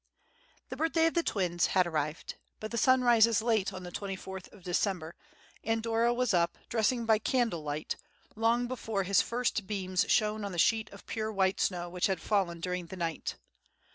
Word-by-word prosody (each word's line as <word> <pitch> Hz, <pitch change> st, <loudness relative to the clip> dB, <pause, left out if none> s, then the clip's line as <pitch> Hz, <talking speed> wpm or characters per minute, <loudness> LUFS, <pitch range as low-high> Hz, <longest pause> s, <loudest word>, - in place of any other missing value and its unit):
The -, -, -5 dB
birthday 325 Hz, +2 st, +2 dB
of 330 Hz, -, +2 dB
the 340 Hz, -, +2 dB
twins 180 Hz, -, 0 dB
had 185 Hz, -, +5 dB
arrived; 155 Hz, -1 st, -3 dB, 0.3 s
but 215 Hz, -, -6 dB
the 235 Hz, -, -2 dB
sun 255 Hz, +2 st, +4 dB
rises 230 Hz, -3 st, +5 dB
late 220 Hz, -4 st, +1 dB
on 185 Hz, -1 st, -8 dB
the 175 Hz, -, -7 dB
twenty 195 Hz, +1 st, -4 dB
fourth 190 Hz, 0 st, -9 dB
of 195 Hz, -, -16 dB
December, 175 Hz, -2 st, -1 dB, 0.5 s
and 225 Hz, 0 st, 0 dB
Dora 230 Hz, +1 st, +2 dB
was 245 Hz, -2 st, +1 dB
up, 170 Hz, -1 st, +2 dB
dressing 235 Hz, +1 st, +1 dB
by 220 Hz, -1 st, +4 dB
candlelight, 170 Hz, -, -1 dB, 0.4 s
long 230 Hz, +2 st, +2 dB
before 225 Hz, -5 st, -2 dB
his 195 Hz, +1 st, +4 dB
first 235 Hz, -4 st, -1 dB
beams 185 Hz, -3 st, 0 dB
shone 215 Hz, -1 st, +2 dB
on 200 Hz, -2 st, -4 dB
the -, -, -5 dB
sheet 220 Hz, +5 st, +2 dB
of 200 Hz, -, -14 dB
pure 220 Hz, -1 st, -3 dB
white 190 Hz, -2 st, +1 dB
snow 175 Hz, -2 st, 0 dB
which 180 Hz, 0 st, 0 dB
had 190 Hz, -3 st, -1 dB
fallen 185 Hz, -5 st, 0 dB
during 180 Hz, 0 st, -3 dB
the 190 Hz, -, -8 dB
night. 165 Hz, -2 st, -3 dB
205 Hz, 190 wpm, -30 LUFS, 180-230 Hz, 0.5 s, had